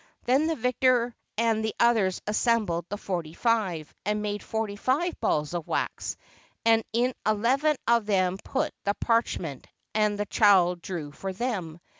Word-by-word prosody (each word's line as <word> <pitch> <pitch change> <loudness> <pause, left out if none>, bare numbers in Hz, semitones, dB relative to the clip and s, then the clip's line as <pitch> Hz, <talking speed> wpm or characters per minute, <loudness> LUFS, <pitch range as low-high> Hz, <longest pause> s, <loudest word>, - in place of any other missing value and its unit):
Then 270 +6 +3
the 325 - 0
vicar 250 -1 +2 0.2
and 225 -1 +2
the 220 - -2
others 220 -6 +3
assembled 210 -6 +1
the 205 - -3
forty 170 -6 -4
five, 195 -10 0
and 210 0 0
made 205 0 -2
forty 220 -2 -3
five 290 - 0
balls 150 +2 0
of 170 -3 -4
wax, - - -2 0.5
and 225 -1 +5
in 245 +3 +1
eleven 255 +8 +2
of 235 -2 +3
them 190 -2 +1
put - - -1
the 200 0 0
parch 230 0 +1
ment; 145 -7 -7 0.3
and 210 -1 +2
the 205 - -1
child 185 -5 +4
drew 165 -5 -5
for 190 +5 -5
them. 185 -7 -3
210 Hz, 160 wpm, -27 LUFS, 185-235 Hz, 0.5 s, and